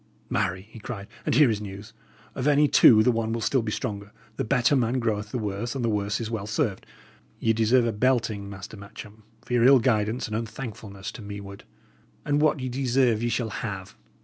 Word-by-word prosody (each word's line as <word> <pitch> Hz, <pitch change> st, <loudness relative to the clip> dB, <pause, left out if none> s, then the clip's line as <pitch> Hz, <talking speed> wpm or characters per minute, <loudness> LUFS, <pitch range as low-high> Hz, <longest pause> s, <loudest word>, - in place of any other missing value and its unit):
"Marry!" 95 Hz, +1 st, -1 dB
he 110 Hz, +2 st, -13 dB
cried, 105 Hz, -3 st, -7 dB, 0.2 s
"and -, -, +2 dB
here 140 Hz, -3 st, +6 dB
is 105 Hz, -1 st, -2 dB
news! 100 Hz, 0 st, -9 dB, 0.4 s
Of 130 Hz, -, -2 dB
any 150 Hz, 0 st, +5 dB
two 110 Hz, -5 st, +7 dB
the 125 Hz, -, +4 dB
one 115 Hz, -1 st, -1 dB
will 115 Hz, -, -1 dB
still 130 Hz, +3 st, +2 dB
be 110 Hz, -1 st, -3 dB
stronger. 100 Hz, -1 st, -4 dB, 0.2 s
The 135 Hz, -, -2 dB
better 125 Hz, +3 st, +2 dB
man 125 Hz, 0 st, +1 dB
throweth 105 Hz, -3 st, -1 dB
the -, -, -2 dB
worse, 110 Hz, +3 st, -3 dB
and 125 Hz, -3 st, -1 dB
the 115 Hz, -, +1 dB
worse 105 Hz, 0 st, -1 dB
is 115 Hz, -1 st, -4 dB
well 105 Hz, -3 st, -3 dB
served. 105 Hz, -2 st, -1 dB, 0.5 s
Ye 115 Hz, -, +2 dB
deserve 115 Hz, +2 st, +3 dB
a 115 Hz, -, +1 dB
belting, 110 Hz, -3 st, 0 dB
Master 100 Hz, +2 st, -9 dB
Matcham, 105 Hz, +2 st, -11 dB, 0.2 s
for -, -, -5 dB
your 120 Hz, -1 st, +3 dB
ill 135 Hz, +2 st, +8 dB
guidance 110 Hz, -1 st, +1 dB
and 110 Hz, -, -4 dB
unthankfulness 110 Hz, -4 st, -6 dB
to -, -, -10 dB
meward; 100 Hz, -1 st, -8 dB, 0.6 s
and 145 Hz, 0 st, +1 dB
what 155 Hz, -1 st, +3 dB
ye 130 Hz, -, -3 dB
deserve 125 Hz, -3 st, +1 dB
ye 120 Hz, -, 0 dB
shall 115 Hz, -1 st, -1 dB
have." 100 Hz, -5 st, -5 dB
115 Hz, 205 wpm, -26 LUFS, 105-125 Hz, 0.6 s, ill